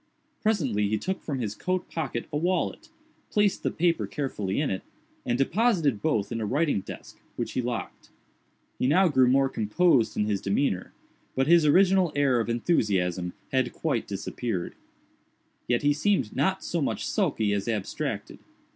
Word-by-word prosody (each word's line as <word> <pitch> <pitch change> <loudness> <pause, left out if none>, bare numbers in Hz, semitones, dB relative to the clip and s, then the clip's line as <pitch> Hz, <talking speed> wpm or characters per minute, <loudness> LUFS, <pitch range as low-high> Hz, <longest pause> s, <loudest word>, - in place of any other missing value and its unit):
Presently 135 - +1
he 110 - +1
took 190 - -3
from 145 -4 -3
his 110 -5 -2
coat 185 +10 -2
pocket 135 -7 -3
a - - +1
wallet, 185 - -1 0.4
placed 205 -2 +2
the - - 0
paper 170 0 +1
carefully 105 -9 -2
in 145 - 0
it, 95 - -2 0.5
and 120 0 +1
deposited 160 - +2
both 110 -11 0
in 115 -1 -2
a - - -1
writing 145 -3 +1
desk, - - -10 0.2
which - - -3
he 130 - -1
locked. 120 -1 -5 0.7
He 125 - +2
now 180 +6 +4
grew 130 -4 +4
more 135 +2 +4
composed 120 - +2
in 105 - +2
his 105 -2 -1
demeanor; 100 -2 0 0.4
but 135 - +2
his 165 0 +5
original 185 +1 +4
air 140 -4 +3
of 115 - -2
enthusiasm 95 - 0 0.2
had 130 -2 +1
quite 140 -8 -1
disappeared. 100 -1 -4 0.9
Yet 120 +1 +1
he 145 0 +4
seemed 150 - 0
not - - +1
so - - -2
much - - -1
sulky 105 -2 +1
as 100 +1 -2
abstracted. 110 -4 -3
130 Hz, 165 wpm, -27 LUFS, 105-165 Hz, 0.9 s, his